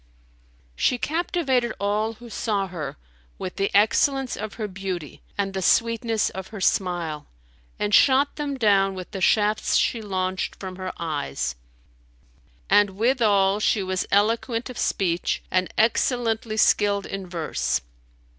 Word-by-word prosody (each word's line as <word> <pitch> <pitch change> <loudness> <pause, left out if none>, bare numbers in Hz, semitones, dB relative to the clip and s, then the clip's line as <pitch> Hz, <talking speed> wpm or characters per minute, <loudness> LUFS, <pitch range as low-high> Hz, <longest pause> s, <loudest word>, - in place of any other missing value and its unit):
"[FN#292] - - -34
She 250 - +2
captivated 275 -6 0
all 210 +2 0
who 240 +2 -13
saw 210 -3 -1
her, 165 -7 -6 0.4
with 185 - -6
the 195 - +1
excellence 260 +6 +2
of 215 0 -6
her 220 -2 -3
beauty 185 -5 -6 0.2
and 195 -1 -1
the 190 - -2
sweetness 230 +2 +2
of 190 0 -7
her 215 - -8
smile,[FN#293] 175 -5 0 0.5
and 210 0 -2
shot 275 +4 +5
them 285 -2 -3
down 195 -4 +3
with 185 -1 -8
the 195 -3 -5
shafts 210 +2 +2
she 230 - +1
launched 185 -2 -2
from 185 -1 -8
her 185 -1 -4
eyes; 145 - -3 1.1
and 200 -2 +3
withal 210 -5 +3
she 210 -1 +1
was 185 0 -2
eloquent 230 +4 +1
of 245 - -10
speech 175 -3 0
and 185 0 +1
excellently 225 -1 +1
skilled 205 -2 +3
in 195 -1 -6
verse. 170 -3 -1
200 Hz, 140 wpm, -24 LUFS, 185-225 Hz, 1.1 s, shot